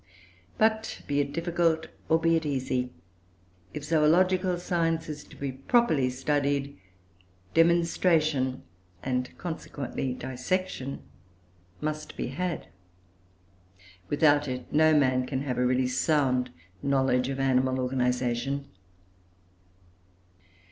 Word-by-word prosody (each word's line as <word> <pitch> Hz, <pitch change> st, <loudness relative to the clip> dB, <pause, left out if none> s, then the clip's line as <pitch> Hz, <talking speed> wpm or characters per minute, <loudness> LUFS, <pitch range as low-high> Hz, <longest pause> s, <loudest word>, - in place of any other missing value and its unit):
But, 220 Hz, 0 st, +1 dB
be 145 Hz, 0 st, 0 dB
it 140 Hz, 0 st, 0 dB
difficult 165 Hz, -1 st, +1 dB, 0.2 s
or 160 Hz, -, +4 dB
be 165 Hz, 0 st, +3 dB
it 160 Hz, -, +1 dB
easy, 130 Hz, -3 st, -1 dB, 0.8 s
if 150 Hz, -, -6 dB
zoological 180 Hz, +4 st, +3 dB
science 165 Hz, -2 st, 0 dB
is 150 Hz, -1 st, -6 dB
to -, -, -15 dB
be 140 Hz, -1 st, -3 dB
properly 140 Hz, -, +2 dB
studied, 140 Hz, +1 st, -1 dB, 0.8 s
demonstration, 165 Hz, -5 st, +2 dB, 0.4 s
and, 125 Hz, -1 st, -1 dB
consequently, 140 Hz, -6 st, -4 dB
dissection, 135 Hz, +2 st, -3 dB, 0.8 s
must 155 Hz, 0 st, -4 dB
be -, -, -2 dB
had. 175 Hz, +4 st, -3 dB, 1.4 s
Without 145 Hz, 0 st, +3 dB
it, 125 Hz, -1 st, -5 dB
no 155 Hz, 0 st, +5 dB
man 130 Hz, -2 st, +2 dB
can 135 Hz, 0 st, -2 dB
have 125 Hz, -3 st, -2 dB
a 125 Hz, -, +3 dB
really 130 Hz, +1 st, +2 dB
sound 130 Hz, -1 st, +1 dB, 0.3 s
knowledge 130 Hz, -2 st, +2 dB
of 135 Hz, 0 st, -3 dB
animal 130 Hz, -1 st, +2 dB
organisation. 125 Hz, +1 st, 0 dB
140 Hz, 105 wpm, -28 LUFS, 130-165 Hz, 1.4 s, no